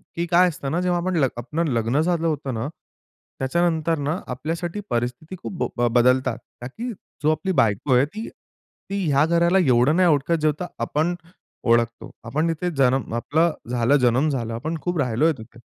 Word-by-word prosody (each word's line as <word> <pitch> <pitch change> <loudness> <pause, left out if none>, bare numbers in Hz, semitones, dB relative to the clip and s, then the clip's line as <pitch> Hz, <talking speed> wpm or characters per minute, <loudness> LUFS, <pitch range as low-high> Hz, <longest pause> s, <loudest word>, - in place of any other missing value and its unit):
की 170 - -1
काय 180 +2 +5
असतं 140 -4 -5
ना, 175 - 0
जेव्हा 180 -1 +1
आपण 185 0 -1
ल 140 -4 +4
आपलं 150 +8 -2
लग्न 115 +5 +1
झालं 165 0 +1
होतं 145 -4 -2
ना, 115 +3 -3 0.7
त्याच्यानंतर 165 +3 +1
ना 150 +5 -1
आपल्यासाठी 165 +8 -3
परिस्थिती 125 +9 -3
खूप - - -5 0.2
ब 120 0 +3
बदलतात 125 +2 +3 0.2
का 120 - -5
की 235 - -6 0.3
जो 155 - +4
आपली 190 +5 -1
बायको 110 +4 +1
आहे 125 +3 +5
ती 215 +9 -7 0.6
ती 200 0 -2
ह्या 140 +2 +4
घराला 170 +3 +3
एवढं 130 -2 +4
नाही 185 0 +4
ओळखत 145 +2 +2
जेव्हढं 155 +3 0 0.2
आपण 160 +4 0 0.5
ओळखतो. 115 0 +1
आपण 150 +8 -1
इथे 165 +2 -1
जनम 130 -3 +2
आपला 160 +8 +2 0.2
झाला, 120 +2 +2
जनम 125 +3 +2
झाला. 115 -5 -2
आपण 160 +7 -3
खूप 175 +2 -2
राहिलोय 135 +5 +2
तिथे. 115 +1 -13
150 Hz, 175 wpm, -23 LUFS, 125-170 Hz, 0.7 s, काय